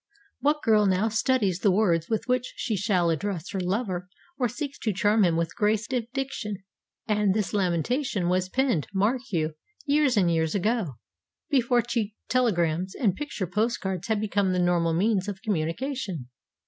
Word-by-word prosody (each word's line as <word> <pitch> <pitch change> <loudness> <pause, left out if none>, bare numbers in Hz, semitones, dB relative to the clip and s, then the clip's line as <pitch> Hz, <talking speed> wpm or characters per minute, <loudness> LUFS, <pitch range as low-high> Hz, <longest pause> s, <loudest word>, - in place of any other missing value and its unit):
What 300 +1 +1
girl 215 -2 +4
now 190 +4 +2
studies 220 -5 +1
the 200 - +3
words 180 -5 +2
with 220 -2 0
which 250 0 0
she 220 - -2
shall 185 -4 +2
address 175 +1 -3
her 195 - -2
lover, 185 -1 -2 0.3
or 250 -2 +2
seeks 280 +4 -5
to 220 - 0
charm 210 +2 +3
him 170 -3 +3
with 165 -1 -2
grace 215 0 +1
of 240 -3 -1
diction?' 245 -8 -4 0.4
And 210 -2 +2
this 215 -2 -1
lamentation 195 - 0
was 185 +1 +1
penned, 255 - +1
mark 220 +6 +2
you, 160 -3 0 0.3
years 285 -4 +3
and 180 -4 +4
years 160 +1 0
ago, 205 - 0 0.6
before 245 -3 +3
cheap 230 -3 -2
telegrams 185 -8 +1
and 205 -8 +1
picture 290 -6 -4
post 215 +7 0
cards 190 0 -3
had 220 -2 +1
become 200 -3 +1
the - - 0
normal 175 -2 +2
means 195 +2 +1
of 195 -2 -5
communication! 190 - -2
205 Hz, 170 wpm, -26 LUFS, 180-235 Hz, 0.6 s, girl